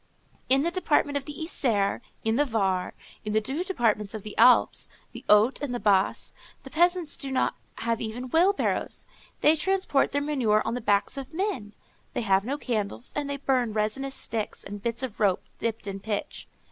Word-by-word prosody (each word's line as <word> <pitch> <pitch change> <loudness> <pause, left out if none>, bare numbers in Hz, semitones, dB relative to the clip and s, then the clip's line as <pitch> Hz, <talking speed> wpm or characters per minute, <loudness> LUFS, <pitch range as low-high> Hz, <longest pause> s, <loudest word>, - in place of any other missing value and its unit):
In 270 +2 +5
the 340 - +1
department 295 -5 +1
of 280 -1 -2
the 295 - -7
Isère, 235 - 0 0.2
in 225 0 +1
the 290 - +4
Var, 195 -8 -1 0.3
in 210 - -3
the 215 - +4
two 270 +10 -3
departments 220 - 0
of 215 - -6
the 215 - -8
Alpes, 245 +2 +5 0.2
the - - -10
Hautes, 210 +7 +5
and 270 -4 -2
the - - -2
Basses, 195 -2 +1 0.3
the 270 - -11
peasants 350 -1 +1
have 270 - -4
not 260 - +1 0.5
even 240 +3 -5
wheelbarrows; 370 +5 +1 0.4
they 305 - +6
transport 375 -4 +1
their 285 - +1
manure 245 -8 +2
on 225 - -1
the 245 - -3
backs 205 +4 +2
of 275 +4 -9
men; 345 - -2 0.4
they - - 0
have 195 -3 +2
no 275 +4 -2
candles, 230 -3 -3
and 290 -1 -2
they 280 - -2
burn 255 -5 0
resinous 245 +6 -1
sticks, 220 -2 -3
and 205 0 -8
bits 235 +4 -2
of 245 -5 -5
rope 200 -4 +2 0.2
dipped 225 -2 -2
in 195 -1 -5
pitch. 205 +1 -4
245 Hz, 185 wpm, -27 LUFS, 210-285 Hz, 0.5 s, they